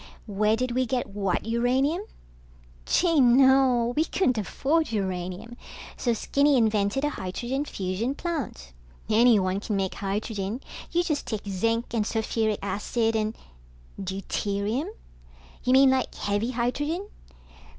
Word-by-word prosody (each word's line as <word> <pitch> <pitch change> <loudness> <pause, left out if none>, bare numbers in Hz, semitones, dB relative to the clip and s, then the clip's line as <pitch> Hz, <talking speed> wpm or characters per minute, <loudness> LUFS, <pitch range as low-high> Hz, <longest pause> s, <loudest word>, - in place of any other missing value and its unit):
Where 210 +1 +1
did 255 +2 -2
we 255 +1 0
get 245 +1 0
what 195 -3 -1
uranium? 255 - +1 0.9
Gee, 335 -4 +3
no, 255 -1 +5
we 310 - +3
couldn't 255 - +1
afford 295 - 0
uranium, 190 +2 -3 0.4
so 240 - 0
Skinny 280 +5 +2
invented 215 +2 +1
a 295 - +2
hydrogen 245 +9 -3
fusion 200 +3 -2
plant. 285 - -4 0.4
Anyone 215 -4 +4
can 210 0 -3
make 195 -1 -1
hydrogen. 205 +2 -3 0.3
You 345 +1 +2
just 305 -4 -2
take 215 -2 -4
zinc 230 +5 -1
and 225 -2 +1
sulfuric 220 -1 0
acid 225 +3 -1
and... 215 0 -1 0.6
Deuterium? 200 - -2 0.8
You 255 - +2
mean 265 0 +7
like 260 -1 0
heavy 205 +3 -1
hydrogen? 290 - -2
230 Hz, 125 wpm, -26 LUFS, 205-265 Hz, 0.9 s, mean